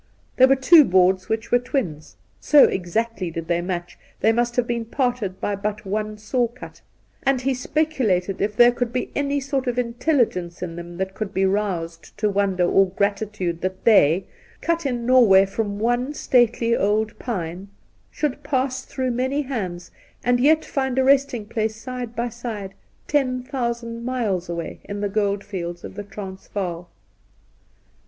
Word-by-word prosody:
There 260 - +7
were 270 - +5
two 300 +4 +7
boards 185 -3 +3
which 220 0 -2
were 245 - +5
twins; 240 - -3 0.2
so 295 -2 +6
exactly 190 +1 0
did 165 0 -6
they 170 0 +1
match, 175 -1 -5 0.2
they 220 - +4
must 240 +1 0
have 245 - +2
been 235 -1 -2
parted 235 -6 -2
by 205 - -1
but 210 +1 -4
one 215 +2 -3
saw 240 +3 0
cut; 245 +2 -12 0.4
and 270 -2 +1
he 270 +1 +1
speculated 250 - 0
if 205 +1 0
there 240 +1 +7
could 245 -1 -2
be 250 0 -3
'any 285 0 0
sort 275 -1 -2
of 245 0 -1
intelligence 235 - 0
in 165 -2 -5
them 170 0 -8
that 190 0 -3
could 200 0 -5
be 190 +1 +2
roused 185 -5 -2
to 210 -1 +1
wonder 195 -3 +1
or 195 +2 +4
gratitude 200 -3 -2
that 185 0 -3
they, 185 -5 +5 0.3
cut 335 -3 0
in 240 -3 -2
Norvjsray 230 -7 +6
from 200 0 -3
one 245 +6 0
stately 235 -3 +2
old 210 +1 0
pine, 185 -5 -4 0.4
should 290 -2 -2
pass 265 -2 -1
through 260 -2 -3
many 260 +4 0
hands 190 -10 -5 0.3
and 245 0 +2
yet 310 +5 +4
find 265 -2 -2
a 265 - +4
resting 270 -4 +2
place 220 0 -2
side 245 0 -6
by 235 +1 -1
side 220 -5 -6 0.3
ten 255 -4 +1
thousand 235 -3 -3
miles 220 -9 -1
away 170 -1 -5
in 205 0 -5
the 205 0 -1
gold 200 -1 0
fields 175 -3 -6
of - - -8
the 205 - -6
Transvaal. 190 -3 -6
220 Hz, 165 wpm, -23 LUFS, 190-255 Hz, 0.4 s, There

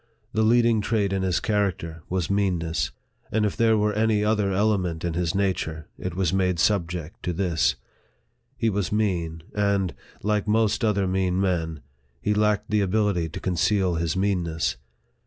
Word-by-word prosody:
The 110 - +1
leading 115 0 +4
trait 105 -2 0
in 95 - 0
his 95 -2 +1
character 95 -6 -1
was 90 -2 -1
meanness; 90 -5 0 0.4
and 110 0 +2
if 105 - -1
there 115 -1 +3
were 105 0 +1
any 110 -1 +2
other 105 -2 +1
element 95 -5 0
in 85 - -1
his 85 0 -1
nature, 90 -5 -1
it 90 -2 -5
was 95 -2 0
made 90 -2 +1
subject 85 -3 0
to 90 - -2
this. 85 -5 +1 0.8
He 115 -1 +1
was 100 -2 -1
mean; 85 -7 -1
and, 100 -3 +1 0.3
like 105 0 0
most 110 +1 +2
other 105 -3 +2
mean 95 0 0
men, 80 -6 -1 0.4
he 105 - 0
lacked 105 0 +1
the 105 -1 +3
ability 100 -4 +1
to - - -6
conceal 95 +1 +1
his 85 +1 -1
meanness. 90 -6 0
95 Hz, 160 wpm, -25 LUFS, 85-105 Hz, 0.8 s, leading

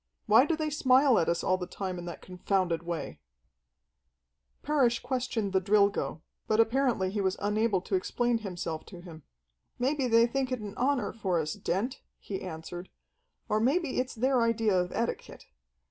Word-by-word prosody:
"Why 235 +7 +6
do 330 - +1
they 310 -1 -2
smile 265 -4 +4
at 165 - +1
us 170 - 0
all 185 0 +1
the 180 - -4
time 185 -2 -5
in 175 - -7
that 170 - -8
confounded 180 -2 -1
way?" 170 -2 -5 1.4
Parrish 265 -5 +2
questioned 245 -6 -2
the 190 - +3
Drilgo, 200 -6 +1 0.2
but 215 - +1
apparently 225 -5 +2
he 205 0 -1
was 190 -1 0
unable 210 -1 +1
to - - -8
explain 245 - +1
himself 175 -6 -5
to 180 -4 -11
him. 165 -3 -11 0.6
"Maybe 265 +1 0
they 230 0 +5
think 260 +2 -2
it 255 - -1
an 205 -2 -7
honor 255 -5 0
for 190 -6 -1
us, 155 -1 -2
Dent," 230 +10 -2 0.2
he 195 -2 -6
answered, 175 +1 -7 0.6
"or 215 - +1
maybe 275 +5 +1
it's 255 0 -2
their 255 +2 +2
idea 225 -2 +2
of 180 -1 0
etiquette. 235 - -4
215 Hz, 170 wpm, -29 LUFS, 185-255 Hz, 1.4 s, Why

